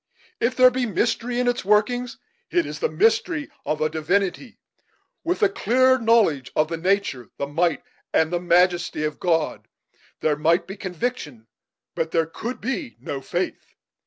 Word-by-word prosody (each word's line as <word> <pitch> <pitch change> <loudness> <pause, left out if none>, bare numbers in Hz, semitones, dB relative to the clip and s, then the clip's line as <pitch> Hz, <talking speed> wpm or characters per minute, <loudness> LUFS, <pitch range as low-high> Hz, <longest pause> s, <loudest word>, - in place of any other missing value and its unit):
If 245 +2 +1
there 255 0 +7
be 250 -1 -1
mystery 240 +3 -1
in 250 - +1
its 245 0 0
workings, 235 +5 +1 0.3
it 345 -1 +1
is - - -6
the 475 - 0
mystery 430 -9 +1 0.2
of 155 - -1
a 155 - +3
Divinity. 180 - -1 0.7
With 350 - -1
a 200 - +6
clear 255 +6 +3
knowledge 220 - +2
of 155 +1 +2
the 165 - -3
nature, 165 - 0
the 140 - -2
might, 165 +3 0 0.3
and 160 +2 +2
the 175 - +1
majesty 175 -2 +2
of 150 0 -3
God, 165 -3 0 0.5
there 155 -1 +2
might 165 +4 +2
be 195 - -8
conviction, 180 - -4 0.5
but 160 - -2
there 165 0 +1
could 230 +10 -6
be 205 - -4
no 135 +2 -5
faith. 175 +7 -4
190 Hz, 160 wpm, -23 LUFS, 160-245 Hz, 0.7 s, there